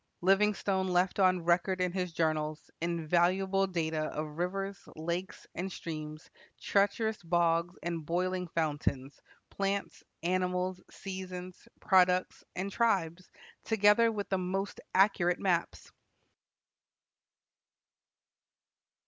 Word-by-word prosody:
Livingstone 195 0 +2
left 180 +2 +1
on 185 -3 +3
record 180 +2 +2
in 180 -1 +1
his 180 -1 -2
journals 155 -2 -1
invaluable 175 +4 +1
data 160 -4 -1
of 155 +1 -5
rivers, 195 +2 -2 0.2
lakes, 170 +4 -4
and 190 +2 -4
streams, 155 -2 -7 0.3
treacherous 205 +2 +1
bogs, 170 0 +1
and 170 -2 -3
boiling 180 +3 -1
fountains, 145 -4 -2 0.3
plants, 200 0 -2 0.2
animals, 180 +1 0
seasons, 185 -2 -7
products, 185 -2 +3
and 190 +2 -3
tribes, 185 -6 0 0.3
together 220 +1 +4
with 205 -2 -4
the 190 - +1
most 195 +2 -3
accurate 185 -3 +4
maps. 175 -3 -1
180 Hz, 100 wpm, -31 LUFS, 170-195 Hz, 0.3 s, together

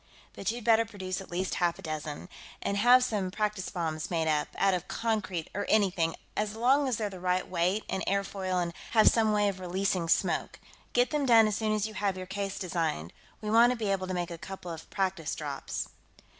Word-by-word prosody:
But 195 - -3
you'd 235 +1 -3
better 230 0 +5
produce 195 -4 -5
at 190 - -11
least 185 +2 -2
half 175 -1 +2
a 195 - -12
dozen. 155 0 -5 0.3
And 200 - -1
have 245 +4 +6
some 205 -6 -1
practice 210 -1 -2
bombs 160 -4 -3
made 165 -2 0
up, 150 -1 +1
out 195 -1 +3
of 180 -2 -2
concrete 210 -7 -2
or 205 - -3
anything, 185 -6 +2 0.2
as 210 0 -1
long 265 +5 +3
as 250 -4 0
they're 215 - -1
the 185 - -8
right 180 0 0
weight 185 +4 0
and 190 - -2
airfoil 195 -2 0
and 170 -1 -2 0.2
have 220 -2 +6
some 220 -2 +2
way 205 -1 +3
of 195 -2 -2
releasing 185 -1 -1
smoke. - - +1 0.3
Get 245 0 +3
them 295 -2 0
done 225 -2 +7
as 210 - -1
soon 220 -1 0
as 215 -1 +1
you 220 - -9
have 195 -2 -1
your 185 - -5
case 195 +1 -4
designed. 165 - -2 0.3
We 210 -1 -3
want 235 +2 +6
to - - -6
be 215 -3 -1
able 185 -1 -1
to 185 - -3
make 175 -1 -2
a 170 - -6
couple 190 -1 -7
of 160 -1 -9
practice 190 -5 -1
drops." 145 -3 -4
195 Hz, 220 wpm, -29 LUFS, 175-215 Hz, 0.3 s, done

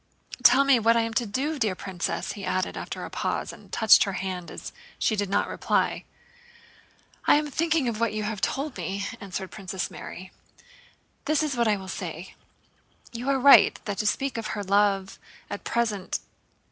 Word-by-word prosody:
Tell 250 +3 +7
me 275 -3 +5
what 230 +1 +4
I - - +4
am 225 0 -2
to 235 0 0
do, 280 +8 -2
dear 215 -6 +1
princess!" 185 -2 -3
he 200 - -8
added 185 0 -1
after - - -5
a - - -9
pause, - - -2
and - - -16
touched 220 -2 +6
her 195 - -3
hand 180 -1 -4
as - - -8 0.2
she 220 - +1
did 205 -2 -2
not 200 +1 +1
reply. - - 0 1.2
"I - - +7
am 300 0 0
thinking 315 -3 +1
of 225 -2 -2
what 230 -1 +1
you 215 0 -3
have 210 -2 -3
told 275 -2 -2
me," 195 +3 -3
answered 190 -1 -6
Princess 190 -2 -4
Mary. 185 +1 -9 0.9
"This 310 0 +2
is 295 -3 -1
what 235 -1 +2
I 215 - +3
will 190 -1 -9
say. 180 -1 -6 0.8
You 240 +3 -3
are 275 - +3
right 275 +2 +7
that 205 -3 -3
to 210 - 0
speak 275 +5 0
to 230 - -3
her 215 -1 -4
of 195 -1 -8
love 200 -1 +2 0.3
at - - -5
present..." 220 -5 -1
215 Hz, 190 wpm, -26 LUFS, 195-250 Hz, 1.2 s, Tell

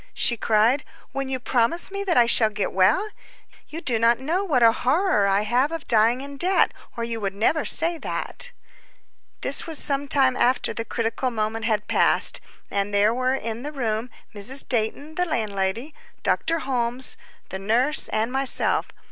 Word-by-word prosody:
she 240 - +2
cried, 225 +5 +2 0.3
"when 275 0 -4
you 260 -1 -2
promise 250 +9 +2
me 395 0 -4
that 365 -7 0
I 240 - +6
shall 230 -1 +4
get 210 -1 -3
well? 195 - +2 0.6
You 325 +2 -7
do 235 -7 0
not 230 +1 +3
know 330 +9 -1
what 290 -11 +1
a 230 - +7
horror 255 - +1
I 195 +1 +2
have 250 +7 +1
of 330 -3 -6
dying 230 +3 +2
in 280 0 -9
debt, 370 +5 +2 0.2
or 235 - -3
you 230 -1 -4
would 195 -1 -3
never 260 +9 +1
say 335 0 +3
that." - - -4 0.9
This - - -1
was 320 -2 -5
some 280 0 -1
time 265 -2 +2
after 255 +1 +1
the 230 - -5
critical 230 +3 -2
moment 225 -1 -3
had 215 -3 -1
passed, - - +2 0.3
and 200 0 -1
there 205 +2 +3
were 255 +1 0
in 230 -3 -5
the 295 +3 -6
room 235 -4 -3 0.2
Mrs. 220 +7 0
Dayton, 250 +6 -2
the 360 +2 -1
landlady, 215 +1 -2 0.3
Dr. 330 0 0
Holmes, 250 -1 +1 0.3
the 190 - -6
nurse, 245 +10 +2
and 220 +2 -1
myself. 270 0 +2
245 Hz, 175 wpm, -23 LUFS, 220-285 Hz, 0.9 s, a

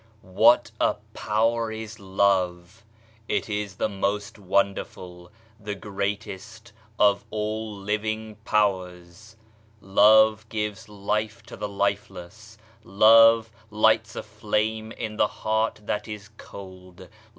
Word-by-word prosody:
HAT 110 +6 +4
a - - +3 0.2
power 115 +1 0
is 110 0 -7
Love! 95 0 0 0.4
It - - -1
is 105 -2 -4
the - - 0
most 100 +1 -3
wonderful, 90 -2 -2 0.3
the 105 -1 -5
greatest 105 +2 -5 0.2
of 100 -1 +3
all 110 0 -4
living 110 +2 -3
powers. 95 0 -2 0.4
Love 110 +2 +4
gives 105 0 -4
life 105 +2 -3
to 115 - -11
the 105 0 -5
lifeless. 100 +1 -4 0.3
Love 115 +3 +6 0.2
lights 110 +1 +2
a - - -5
flame 110 +1 -2
in 110 -2 -6
the - - +3
heart 110 +1 -2
that 105 +1 -3
is 105 -1 -8
cold. 95 -3 -12
105 Hz, 110 wpm, -25 LUFS, 100-110 Hz, 0.4 s, Love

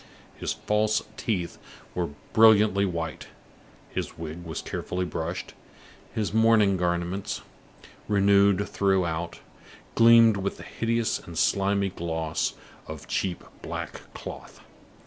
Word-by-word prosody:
His - - -2
false 105 0 +1
teeth 90 -7 -2 0.3
were 90 -2 -1 0.2
brilliantly 105 -3 +6
white; 85 -3 -4 0.6
his - - -4
wig 80 +1 -6
was 80 -1 -5
carefully 90 0 -3
brushed; 85 0 -4 0.6
his 105 -3 -2
mourning 110 -3 +5
garments, 90 +2 -2 0.6
renewed 100 -1 +4
throughout, 85 -4 0 0.5
gleamed 115 -2 +7
with 100 0 -3
the - - -10
hideous 115 0 -1
and 85 -1 -10
slimy 100 +1 +2
gloss 80 -3 -2 0.3
of - - -8
cheap 90 -3 -2 0.2
black - - -7
cloth. - - -9
95 Hz, 110 wpm, -26 LUFS, 85-105 Hz, 0.6 s, gleamed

